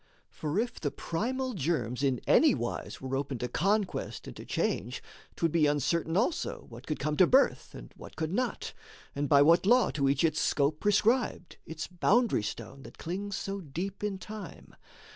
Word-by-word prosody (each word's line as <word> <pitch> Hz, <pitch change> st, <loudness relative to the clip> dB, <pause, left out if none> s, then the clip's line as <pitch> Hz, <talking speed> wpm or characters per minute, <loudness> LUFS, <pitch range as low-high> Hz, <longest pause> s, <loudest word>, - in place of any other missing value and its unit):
For 150 Hz, +3 st, -3 dB
if 235 Hz, +3 st, -1 dB
the 145 Hz, -, -1 dB
primal 255 Hz, -, -3 dB
germs 135 Hz, -, -1 dB
in 135 Hz, -4 st, +1 dB
any -, -, +5 dB
wise -, -, -4 dB
Were 130 Hz, 0 st, -3 dB
open 135 Hz, -1 st, -2 dB
to 125 Hz, -, -3 dB
conquest 200 Hz, -, -1 dB
and -, -, -9 dB
to -, -, -9 dB
change, 120 Hz, +8 st, -2 dB, 0.3 s
'twould 165 Hz, -2 st, 0 dB
be 155 Hz, -2 st, +3 dB
Uncertain 155 Hz, +4 st, 0 dB
also 250 Hz, -, -1 dB
what 120 Hz, +3 st, -12 dB
could 155 Hz, -, -2 dB
come 150 Hz, +1 st, -1 dB
to 185 Hz, -, +6 dB
birth 270 Hz, +2 st, +2 dB
And -, -, -11 dB
what -, -, -12 dB
could 160 Hz, +1 st, -3 dB
not, 250 Hz, +4 st, -2 dB, 0.4 s
and 145 Hz, 0 st, -2 dB
by 140 Hz, -1 st, +7 dB
what 170 Hz, +5 st, +4 dB
law 245 Hz, +1 st, +5 dB
to 140 Hz, -2 st, +1 dB
each 140 Hz, +2 st, +1 dB
Its 155 Hz, -1 st, +2 dB
scope 150 Hz, +1 st, +1 dB
prescribed, 210 Hz, -2 st, +1 dB
its 160 Hz, 0 st, -5 dB
boundary 210 Hz, -, +2 dB
stone 115 Hz, +5 st, -6 dB
that -, -, -13 dB
clings 195 Hz, +4 st, -4 dB
So 195 Hz, 0 st, -4 dB
deep 180 Hz, +7 st, -5 dB
in 205 Hz, -2 st, -1 dB
Time. 210 Hz, +2 st, -9 dB
165 Hz, 180 wpm, -30 LUFS, 140-205 Hz, 0.4 s, by